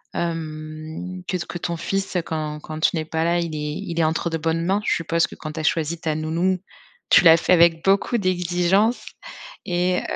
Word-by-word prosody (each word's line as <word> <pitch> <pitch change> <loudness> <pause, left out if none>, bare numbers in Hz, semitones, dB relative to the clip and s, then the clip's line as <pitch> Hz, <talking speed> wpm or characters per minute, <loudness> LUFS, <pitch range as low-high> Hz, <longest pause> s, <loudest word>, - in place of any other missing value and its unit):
Hem, 160 +2 -5
que 180 - -1
t 170 - -5
que - - -5
ton 170 0 -3
fils, 195 +3 -3
heu, 180 - +2
quand 155 -2 -4
quand 155 +1 -7
tu 160 - +2
n'es 160 -1 -2
pas 160 +1 -1
là, 170 +1 +2
il 165 -2 -3
est 150 0 -3 0.2
il 170 0 -3
est - - +4
entre 160 +2 0
de 160 - 0
bonnes 165 +1 -1
mains. 195 +3 +1
Je - - +2
suppose 165 0 +1
que - - -11
quand 155 0 -7
tu 160 - -5
as - - -3
choisi 160 +1 0
ta 155 -2 -1
nounou, 165 +4 0 0.5
tu - - +7
l'as 165 -1 +8
fait 175 - +2
avec 170 -1 +4
beaucoup 200 +5 +3
d'exigence 185 +3 +1 0.6
et 180 +1 +1
165 Hz, 220 wpm, -22 LUFS, 155-180 Hz, 0.6 s, l'as